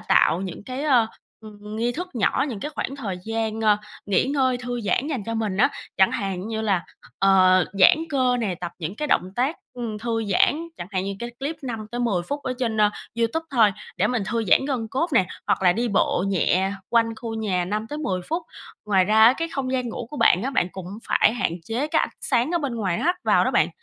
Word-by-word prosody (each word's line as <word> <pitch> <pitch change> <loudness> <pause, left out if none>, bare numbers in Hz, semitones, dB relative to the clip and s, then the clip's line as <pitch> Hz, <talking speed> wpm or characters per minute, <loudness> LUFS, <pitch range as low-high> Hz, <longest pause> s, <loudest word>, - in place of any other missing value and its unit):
tạo 165 +4 +3
những 195 +1 -6
cái, 260 +2 -5
ơ, 250 -6 +4 0.3
ưm, 210 0 -10
nghi 240 +2 0
thức 360 +6 -5
nhỏ, 235 +4 +1
những 215 -6 -5
cái 295 - -4
khoảng 275 - -3
thời 200 -9 -4
gian, 225 0 -2
ơ, 210 -2 +4 0.3
nghỉ 195 -2 +2
ngơi 260 -2 +1
thư 245 -1 -4
giãn 245 +6 0
dành 260 -10 -3
cho 230 - -2
mình 215 -4 -1
á. - - +4 0.3
Chẳng 190 -1 +5
hạn 195 +1 -3
như 220 -1 -2
là, 195 -5 0 0.3
ờ, 185 -1 +5 0.2
giãn 185 - +8
cơ 255 -3 +2
nè, 195 -5 -1
tập 175 -1 -5
những 175 +5 -5
cái 300 -1 -3
động 185 +1 +1
tác, 265 +6 +1 0.2
ưm, 230 -4 -4
thư 225 0 -2
giãn, 295 - +2
chẳng 175 - -6
hạn 190 -1 -1
như 200 0 -3
cái 235 0 -5
clip 295 +4 -3
5 225 -4 -5
tới 240 - -3
10 200 -8 +1
phút 285 0 -3
ở 260 - -2
trên, 230 -3 -1
ơ, 210 0 +5 0.3
YouTube 235 +8 0
thôi 225 -7 +4 0.2
để - - +2
mình 245 -4 0
thư 230 -1 -1
giãn 220 +7 +4
gân 250 -6 -2
cốt 270 +9 0
nè, 190 -8 +4 0.2
hoặc - - +1
là 180 -1 +5
đi 235 +3 -1
bộ 190 -2 +1
nhẹ 190 +1 +1 0.2
quanh 230 -1 +2
khu 225 0 -5
nhà 190 -5 -1
5 210 +4 -3
tới 295 +4 -5
10 185 -11 -2
phút. 330 +2 -1 0.4
Ngoài 190 -3 +3
ra 220 +2 +5
á 235 - +8
cái 330 0 -2
không 275 -2 -3
gian 250 -2 -1
ngủ 230 +1 -5
của 295 - -7
bạn 185 -6 +4
á, 270 - -1
bạn 180 -9 +1
cũng 185 -2 -7 0.2
phải - - +4
hạn 195 - -1
chế 245 - -2
cái - - +2
ánh - - 0
sáng 250 +2 +1
ở 345 - +1
bên 275 -6 -3
ngoài 190 -6 -1
nó - - -3
hắt 355 +1 +2
vào - - +4
đó - - +1
bạn, - - +3
225 Hz, 245 wpm, -24 LUFS, 195-255 Hz, 0.4 s, giãn